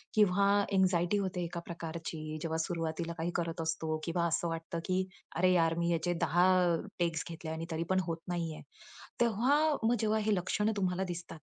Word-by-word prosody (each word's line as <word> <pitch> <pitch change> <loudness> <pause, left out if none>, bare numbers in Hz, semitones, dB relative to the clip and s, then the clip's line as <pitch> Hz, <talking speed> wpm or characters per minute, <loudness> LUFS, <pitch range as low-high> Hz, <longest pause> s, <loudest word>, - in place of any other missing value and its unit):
किंवा 200 -2 +4 0.3
अँक्साइटी 185 0 +3
होते 190 -3 -1
एका 170 0 -4
प्रकारची, 160 -2 -5
जेव्हा 160 0 -1
सुरुवातीला 165 0 -2
काही 165 +2 -1
करत 165 -1 -1
असतो 160 -1 -1
किंवा 170 0 0
असं 170 +1 0
वाटतं, 165 0 -4
की 185 0 +1 0.3
"अरे 185 +2 +4
यार! 165 -2 +3
मी 170 0 +1
याचे 170 +1 +1
10 175 +1 +4 0.3
अ, - - +2 0.2
टेक्स 170 -2 0
घेतले 165 -1 -6
आणि 160 +1 -4
तरी 160 +1 -1
पण 190 0 +3
होत 165 -1 -1
नाही 170 -2 -2
आहे." - - -10 0.6
तेव्हा 240 +5 +3 0.2
मग 230 +2 +4
जेव्हा 220 0 +2
हे 210 0 +2
लक्षण 210 +4 0
तुम्हाला 185 -1 0
दिसतात, 170 -1 -9
170 Hz, 180 wpm, -32 LUFS, 165-185 Hz, 0.6 s, किंवा